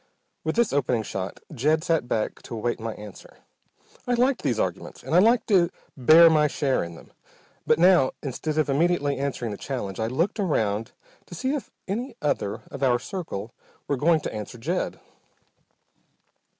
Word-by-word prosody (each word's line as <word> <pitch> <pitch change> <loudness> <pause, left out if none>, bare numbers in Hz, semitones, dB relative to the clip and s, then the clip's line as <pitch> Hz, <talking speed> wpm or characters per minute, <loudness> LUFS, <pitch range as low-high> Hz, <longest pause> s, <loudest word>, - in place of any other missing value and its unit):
With 160 - -1
this 235 -7 +2
opening 125 -5 +1
shot 95 -2 -5
Jed 155 +4 +1
sat 165 -8 +1
back 110 -3 -2
to 120 - -8
await 120 +2 -2
my 115 -1 -4
answer. 105 -2 -12 0.7
I 245 - +2
liked 255 +2 +2
these - - 0
arguments - - -3
and - - -5
I 175 - +7
liked 230 +4 +4
to 180 -5 +4 0.3
bear 155 +6 +8
my 155 -2 +4
share 140 -2 0
in 85 0 -7
them, - - -16 0.5
but - - +4
now, 175 -6 +5
instead 150 +3 -3
of 155 - +2
immediately 145 -1 +1
answering 130 -5 -2
the 100 - -5
challenge, 115 -8 -4
I 110 - 0
looked 165 - -1
around 110 - 0 0.4
to 175 - -9
see 260 - -1
if 290 - -4 0.2
any 235 +8 -3
other 105 -9 -1
of 140 - -7
our 125 -3 +4
circle 125 - -6 0.3
were 145 - +1
going 155 +4 +3
to - - -5
answer 105 +2 -6
Jed. 115 - -2
145 Hz, 175 wpm, -25 LUFS, 120-175 Hz, 0.7 s, bear